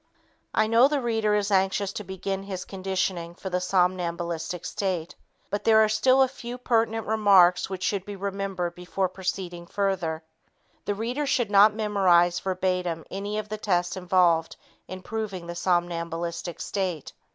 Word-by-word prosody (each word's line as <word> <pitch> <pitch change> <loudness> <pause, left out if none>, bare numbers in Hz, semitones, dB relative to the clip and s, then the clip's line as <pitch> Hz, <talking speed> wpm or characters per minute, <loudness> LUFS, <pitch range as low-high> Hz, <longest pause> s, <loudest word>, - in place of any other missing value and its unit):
I - - +4
know 230 +4 +5
the 290 0 0
reader 225 -4 +1
is 205 0 0
anxious 195 +1 +1
to 215 - -5
begin 190 0 -4
his 195 -2 -6
conditioning 185 -3 -3
for 190 +1 -7
the 180 0 0
somnambulistic 180 -2 -1
state, 185 -4 -2 0.4
but 205 - -2
there 220 -1 +5
are - - +3
still 255 +5 +4
a - - +2
few 245 -1 -8
pertinent 225 -3 0
remarks 195 -5 +4
which 190 -1 -5
should 200 -3 0
be 205 +1 -7
remembered 195 -3 -3
before 180 +2 -2
proceeding 180 -2 -5
further. 180 -6 -1 0.6
The 205 - -1
reader 245 +7 -2
should 240 -6 +1
not 205 +1 +6
memorize 185 -5 +3
verbatim 180 -3 -2
any 200 +2 -4
of 215 -1 -3
the 215 0 -4
tests 175 -4 0
involved 180 -3 +2 0.3
in 185 0 -8
proving 210 -5 -4
the 170 - -5
somnambulistic 170 -1 -2
state. 185 -7 -3
190 Hz, 155 wpm, -26 LUFS, 175-210 Hz, 0.6 s, not